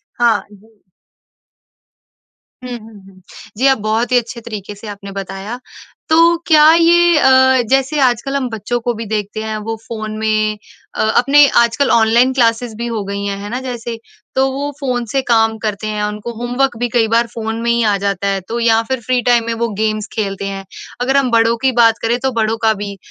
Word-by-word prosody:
हाँ 240 -1 +2
जी। 205 +2 -19 2.0
हुँ, 250 - -7
हुँ, 220 -2 -15
हुँ। 190 -1 -18 0.4
जी, 260 - +2
आप 270 -2 +4
बहुत 220 +4 -1
ही 250 - +5
अच्छे 235 0 -5
तरीके 210 -3 -7
से 205 +2 -12
आपने 200 -1 -8
बताया। 195 +4 -6 0.5
तो 335 +2 +5
क्या 310 -1 +6
ये 340 0 +4
अ, 260 -1 +5
जैसे 270 +3 +1
आजकल 255 +1 +1
हम 260 -3 -1
बच्चों 225 +2 -3
को 240 +1 -2
भी 230 +1 -6
देखते 215 0 -3
हैं, 220 0 -4
वो 225 +1 -4
फ़ोन 215 -2 -5
में 215 -1 0 0.4
अ, - - -4 0.2
अपने 280 +3 +6 0.2
आजकल 235 +4 +1
ऑनलाइन 235 +3 +4
क्लासेज़ 230 -2 +1
भी 235 - -4
हो 230 -3 -3
गई 200 0 -4
हैं, 200 0 -2
है 205 - -6
ना 250 +2 -3
जैसे? 240 -3 -6 0.4
तो 265 0 +2
वो 285 +2 -3
फ़ोन 250 -3 -1
से 270 - +1
काम 225 -1 +3
करते 210 0 -3
हैं। 210 -1 -3
उनको 210 +3 -5
होमवर्क 245 +1 -1
भी 245 +1 -1
कई 230 -2 +1
बार 230 +1 +2
फ़ोन 225 0 -4
में 235 - 0
ही 235 0 +2
आ 200 - +1
जाता 200 0 -1
है, 195 -1 -1
तो 235 +1 -3
या 225 -1 +3
फिर 260 -2 -2
फ्री 255 -1 +1
टाइम 235 -1 +2
में 230 - -1
वो 235 - +1
गेम्स 215 -1 -1
खेलते 200 -3 -3
हैं। 195 0 -6 0.4
अगर 265 +2 +1
हम 275 -3 +2
बड़ों 230 0 +3
की 265 - +3
बात 225 0 +4
करें, 235 +2 +1
तो 265 0 -1
बड़ों 220 +1 0
का 220 - +5
भी। 200 -1 -6
230 Hz, 205 wpm, -16 LUFS, 215-255 Hz, 2.0 s, क्या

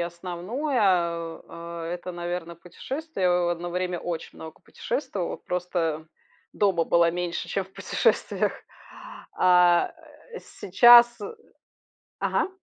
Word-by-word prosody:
основное, 180 - -3
а, 170 -2 -2
э,- 170 - -3
это, 180 +1 -7
наверно, 175 -1 -5
путешествия. 195 - -4
О 175 -1 +2
одно 175 +1 -6
время 180 -1 -2
очень 170 -2 -5
много 160 -1 -10
путешествовала, 230 - -4
просто 165 -3 -3 0.4
дома 195 -5 +1
была 170 0 +3
меньше, 175 -1 -4
чем 195 - -2
в 190 - -22
путешествиях. - - 0 0.9
А, 180 -1 +4 0.4
э, - - -7
сейчас 240 +4 +5
э 460 - -6 0.9
ага. - - 0
175 Hz, 115 wpm, -25 LUFS, 170-190 Hz, 0.9 s, сейчас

